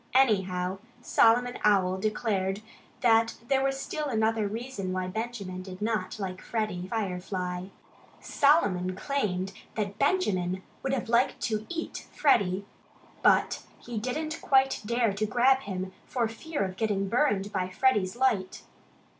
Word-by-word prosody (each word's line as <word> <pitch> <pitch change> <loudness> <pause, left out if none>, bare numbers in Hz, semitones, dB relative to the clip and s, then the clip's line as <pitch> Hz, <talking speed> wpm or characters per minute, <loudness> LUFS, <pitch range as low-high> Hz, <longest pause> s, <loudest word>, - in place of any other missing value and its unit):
Anyhow, 190 -7 +2 0.2
Solomon 245 +2 +4
Owl 190 -3 +3
declared 200 -1 -1 0.4
that 230 -1 +4
there 270 -1 +3
was 270 0 0
still 305 +2 -3
another 220 -3 +1
reason 220 -3 -4
why 185 0 -1
Benjamin 200 -2 -4
did 185 0 -9
not 210 -3 -1
like 185 -2 -5
Freddie 215 -6 -2
Firefly. 185 -3 -3 0.5
Solomon 190 - +2
claimed 195 -6 -1 0.2
that 205 -1 -3
Benjamin 190 - +1 0.2
would 270 - -1
have 250 -4 -1
liked 235 +2 +2
to 215 -1 -2
EAT 330 -1 -5
Freddie. 200 -9 +3 0.6
But - - +3 0.2
he 235 -3 -5
didn't 310 +7 -3
quite 270 0 +3
dare 235 -1 +1
to 215 +2 -1
grab 255 +4 +4
him 190 -6 -5 0.2
for 240 -3 0
fear 290 +5 -3
of 190 -1 -4
getting 205 -3 0
burned 210 -4 +1
by 185 -2 -1
Freddie's 205 -2 +2
light. 235 -7 0
215 Hz, 135 wpm, -28 LUFS, 185-245 Hz, 0.6 s, Solomon